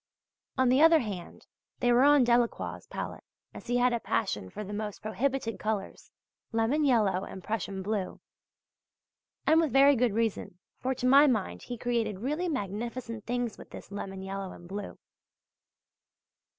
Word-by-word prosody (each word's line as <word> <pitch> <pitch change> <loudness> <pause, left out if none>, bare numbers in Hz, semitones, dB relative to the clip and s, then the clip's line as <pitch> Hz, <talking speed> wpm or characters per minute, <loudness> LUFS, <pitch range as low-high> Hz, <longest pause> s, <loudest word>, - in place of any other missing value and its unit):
On 260 -1 +4
the 260 +3 +4
other 325 0 +7
hand 195 -7 -7 0.3
they 245 -1 +3
were 240 - +5
on 290 -1 +6
Delacroix' 240 -1 0
palette, - - -6 0.3
as - - -11
he 245 +1 +1
had 245 0 +3
a 235 - 0
passion 195 - -2
for 210 - -6
the 205 +1 -7
most 210 -1 -5
prohibited 240 +1 -1
colours 215 -2 -4 0.4
lemon 230 +7 +1
yellow 210 -9 +3
and 190 - -8
Prussian 200 -2 -3
blue; 200 -2 -3 1.3
and 320 +1 +5
with 315 -5 0
very 275 +3 +6
good 240 -3 +2
reason, 225 -5 -1 0.2
for 260 +1 -1
to 250 - -4
my 280 +3 +7
mind 220 -7 -1
he 245 - -6
created 230 -4 -1
really 300 - -2
magnificent 230 - -4
things 245 -2 -2
with - - -12
this - - -11
lemon 195 -1 -6
yellow 195 -1 -5
and 175 - -13
blue. 200 +2 -6
230 Hz, 160 wpm, -29 LUFS, 205-255 Hz, 1.3 s, other